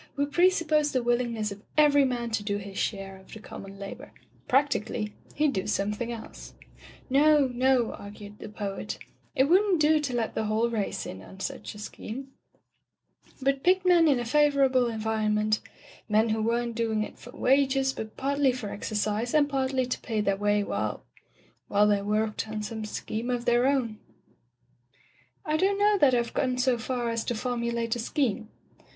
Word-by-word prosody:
We 285 - +1
pre 345 +6 +4
suppose 305 -5 +1
the 255 -2 +1
willingness 235 -3 0
of 200 0 -8 0.2
every 285 -2 +6
man 240 -2 -2
to 220 - 0
do 205 0 -1
his 200 -1 -8
share 195 -2 -3
of 190 - -18
the 220 - -8
common 195 -2 -10
labor. 245 +8 -8 0.4
Practically, 240 -6 +1 0.2
heM 300 -1 +2
do 190 -4 -2
something 210 +3 -1
else." 230 -2 -9 0.5
"No 290 +2 +5
— 250 - -8
no 250 -1 +2
— - - -8
" - - -10
argued 205 0 -10
the - - -8
poet, 205 -2 -5 0.4
"it 265 - +5
wouldn't 370 +4 +4
do 305 +1 +4
to 275 -5 -2
let 230 -2 -1
the 220 - -1
whole 220 +2 +1
race 215 -4 -2
in 95 - -7
on 190 - -13
such 195 - -5
a - - -10
scheme, 235 +5 -7 1.1
but 275 0 +1
picked 370 +1 +3
men 345 -2 +6
in 275 -4 +3
a 240 - -3
favorable 270 -1 +3
environment 215 -1 0 0.3
— - - -22
^men 215 +1 +3
who 220 0 0
weren't 235 +1 0
doing 220 -2 0
it - - -9
for - - -12
wages, 270 0 +3
but 220 -3 -7
pardy 280 0 +2
for 245 -5 -5
exercise 215 +4 -2
and 290 -1 +4
partly 265 -2 0
to 250 - -3
pay 225 -3 -3
their 200 -2 +1
way 205 +1 +1
while - - -3 0.3
— - - -34
^while 205 +1 +4
they 205 -1 +2
worked 215 +2 -1
on 215 -1 -4
some 220 0 -5
scheme 220 +2 -4
of 245 -1 -1
their 240 +1 +3
own 245 -6 0 0.7
" 120 -1 -36
"I 305 0 +1
don't 390 +4 +2
know 410 0 +3
that 265 -5 +5
I've 235 -1 -1
gone 255 -2 0
so 250 -1 +2
far 240 -1 -2
as 230 -1 -1
to 240 - -1
formulate 235 -1 -1
a - - -4
scheme." 230 -3 -1
235 Hz, 190 wpm, -27 LUFS, 215-275 Hz, 1.1 s, every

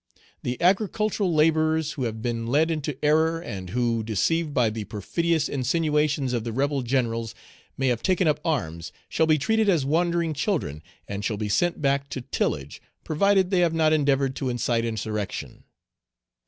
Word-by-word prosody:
The 125 0 -3
agricultural 200 +1 +1
laborers 155 0 +2
who 130 - -3
have 110 -1 -4
been 115 -1 -2
led 155 +6 +2
into 150 -3 -3
error, 160 +2 +3
and 95 - -7
who, 115 +1 0
deceived 150 - 0
by 120 -5 +2
the 110 -1 -5
perfidious 160 - -1
insinuations 150 0 0
of 120 -2 -1
the 115 - -4
rebel 140 +3 0
Generals, 115 -3 -1 0.4
may 135 - -1
have 120 -2 0
taken 185 -2 +2
up 150 - +2
arms, 85 - -2 0.2
shall 160 - +2
be 155 -1 +4
treated 220 +7 +1
as 165 -8 +2
wandering 170 +2 +1
children, 145 - -2 0.3
and 100 0 -5
shall 105 -1 -1
be 105 0 -3
sent 175 +8 +1
back 140 0 +1
to 130 - -4
tillage, 70 - -3 0.2
provided 190 +4 +2
they 185 - +3
have 170 -2 +2
not 155 -1 +3
endeavored 140 -3 +2
to 130 - -2
incite 120 -1 0
insurrection. 110 -2 -4
140 Hz, 170 wpm, -25 LUFS, 115-165 Hz, 0.4 s, be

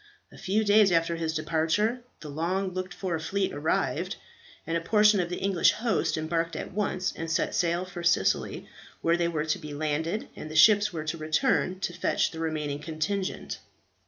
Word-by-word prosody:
A - - -14
few 210 +3 +1
days 205 -1 +5
after 165 0 +2
his 165 -1 -2
departure, 165 +10 0 0.2
the 155 - -8
long 180 +6 -1
looked 185 0 -4
for 180 -2 -3
fleet 190 +4 -1
arrived, 145 +3 -1 0.5
and 165 - -2
a 165 - 0
portion 210 +2 +4
of 175 -1 -1
the 180 - -3
English 195 -3 +3
host 225 -8 0
embarked 165 +1 -1
at - - -5
once, 190 -2 -1
and 165 0 -5
set 165 - 0
sail 175 +1 +1
for 180 -1 -8
Sicily, 170 0 +1 0.4
where 165 0 +3
they 170 0 +1
were 160 -2 -1
to 155 +3 -1
be 150 -3 -7
landed, 155 +6 -2
and 155 - -8
the 155 - -8
ships 205 +5 +6
were 160 -3 -4
to 160 +1 -4
return 185 - +1
to 175 - -2
fetch - - 0
the 160 - -8
remaining 155 -3 -2
contingent. 165 +5 -3
170 Hz, 190 wpm, -27 LUFS, 160-195 Hz, 0.5 s, ships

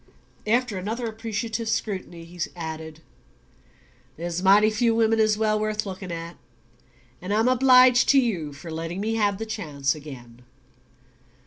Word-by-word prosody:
After 230 -3 +1
another 225 +6 -4
appreciative 225 0 -4
scrutiny 185 -6 -3
he 175 +1 -14 0.2
added: 160 -1 -7 1.2
"There's 170 +1 -4
mighty 205 +3 +5
few 230 +1 +1
women 225 0 +2
as 215 -1 +3
well 215 -1 +1
worth 215 0 -2
looking 190 -2 -7
at, 170 0 -7 0.8
and 180 +3 -5
I'm 220 +3 +2
obliged 255 0 +5
to 280 - +6
you 185 - -1
for 150 +4 -10
letting 165 +3 -5
me 220 +2 -1
have 205 -3 +1
the 225 - -5
chance 150 -11 -2
again." 125 -6 -11
210 Hz, 140 wpm, -24 LUFS, 165-225 Hz, 1.2 s, to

